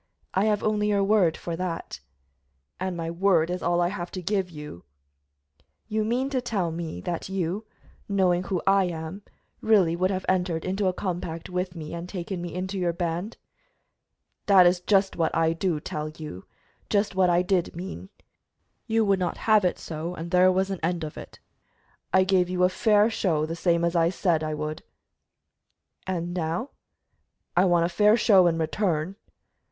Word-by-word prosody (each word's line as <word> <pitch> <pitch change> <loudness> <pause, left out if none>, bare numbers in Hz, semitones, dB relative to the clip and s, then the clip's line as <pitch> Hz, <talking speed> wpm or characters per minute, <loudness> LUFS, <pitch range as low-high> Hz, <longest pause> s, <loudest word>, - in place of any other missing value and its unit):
"I 190 +2 +2
have 210 -1 +1
only 210 -1 +1
your 200 -1 +2
word 195 -5 +3
for 170 - -4
that." 180 -1 -4 0.8
"And 185 -1 -3
my 165 0 -3
word 170 -2 +2
is 180 - -3
all 175 0 +1
I 175 0 +2
have 175 -3 -5
to 185 - -4
give 190 0 0
you." 150 - -9 1.0
"You 215 0 0
mean 250 +5 -1
to 260 -2 0
tell 200 -8 -1
me 160 - -5
that 175 - -4
you, 190 +3 -2 0.4
knowing 185 -3 +2
who 185 -1 -2
I 195 0 +4
am, 165 +2 -5 0.4
really 195 -7 +4
would 185 +2 +1
have 190 -1 -2
entered 180 -3 0
into 190 +1 0
a - - +3
compact 175 -3 -4
with 180 0 -2
me 155 -1 -7
and 170 +1 -6
taken 180 -1 -5
me 175 -1 -5
into 190 +2 -3
your 175 -2 0
band?" 175 +5 -3 1.1
"That 195 -3 +7
is 175 +1 +4
just 195 +1 +2
what 165 -2 0
I 165 0 +2
do 165 -2 -1
tell 150 +1 -4
you 155 - -9 0.4
just 205 0 +1
what 185 -1 +3
I 175 +1 +3
did 180 -3 0
mean. 190 +2 -7 0.8
You 225 -1 +2
would 195 -2 +2
not 180 -2 -2
have 215 -2 +5
it 180 - +1
so, 165 +2 -5
and 170 +1 -7
there 185 0 +5
was 190 +1 0
an 190 - -3
end 170 +1 -1
of 150 - -6
it. - - -10 0.7
I 190 - +5
gave 185 -1 +2
you 180 0 0
a 180 - +5
fair 210 +3 +3
show, 165 -8 0
the 165 +1 -4
same 170 0 +1
as 170 +1 -1
I 165 0 +4
said 170 -3 0
I 155 0 -2
would." 155 +1 -4 1.3
"And 175 -2 -2
now?" 175 - -2 0.8
"I 180 +2 +5
want 175 -2 +3
a - - -1
fair 210 +5 +4
show 195 -5 +5
in 165 -1 +1
return." 165 +1 -1
180 Hz, 185 wpm, -26 LUFS, 170-195 Hz, 1.3 s, That